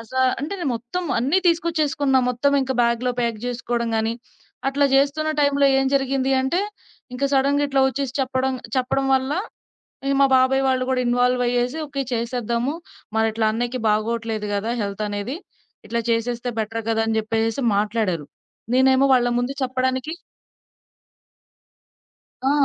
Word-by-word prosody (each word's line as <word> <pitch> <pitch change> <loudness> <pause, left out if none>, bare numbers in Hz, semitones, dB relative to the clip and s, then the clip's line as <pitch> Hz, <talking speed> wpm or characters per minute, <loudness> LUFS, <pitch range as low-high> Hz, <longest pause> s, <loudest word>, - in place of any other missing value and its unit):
అస 230 - -13 0.3
అంటే 300 +7 -4
నేను 285 -7 -1
మొత్తం 245 +11 -4
అన్నీ 275 +10 +2
తీసుకొచ్చేసుకున్నా 310 -5 +2
మొత్తమింక 265 +1 +1
బ్యాగ్‌లో 235 +1 +1
ప్యాక్ 235 -2 -1
జేసుకోవడం 240 -1 -2
గానీ, 220 +1 0 0.6
అట్లా 285 +1 +1
జేస్తున్న 285 +3 +2
టైంలో 285 -1 +3
ఏం 270 - +1
జరిగింది 270 -1 +1
అంటే 265 +8 0 0.5
ఇంక 275 +2 -2
సడెన్‌గా 280 +1 +3
ఇట్లా 270 -1 +2
ఒచ్చేసి 270 -1 -3
చెప్పడం 260 0 0 0.2
చెప్పడం 260 +1 0
వల్ల 265 +1 0 0.7
ఇగ 275 - +2
మా - - +7
బాబాయ్ 265 +1 +3
వాళ్లు 255 -1 +1
గూడా 255 - +1
ఇన్‌వాల్వ్ 245 +1 +2
అయ్యేసి 245 +5 0
ఓకే 275 -1 -3
చేసేద్దాము 235 +3 -1 0.4
మరిట్లా 220 0 +1
అన్నయ్యకి 245 +2 -2
బాగోట్లేదు 215 0 -1
గదా! 210 +3 -1
హెల్త్ 200 +1 -4
అనేది, 205 +8 -4 0.5
ఇట్లా 235 0 -1
చేసేస్తే 235 +1 -1
బెటర్ 225 +1 -4
గదా! 225 0 +1
అని 225 - 0
జెప్పేసేసి 225 +3 -1
మాట్లాడారు. 205 -7 0 0.5
నేనేమో 265 +1 +4
వాళ్ళ 245 -1 +3
ముందు 250 +3 -2
చెప్పడానికి 260 +3 -1 2.4
ఆ! - - +3
255 Hz, 135 wpm, -22 LUFS, 230-275 Hz, 2.4 s, మా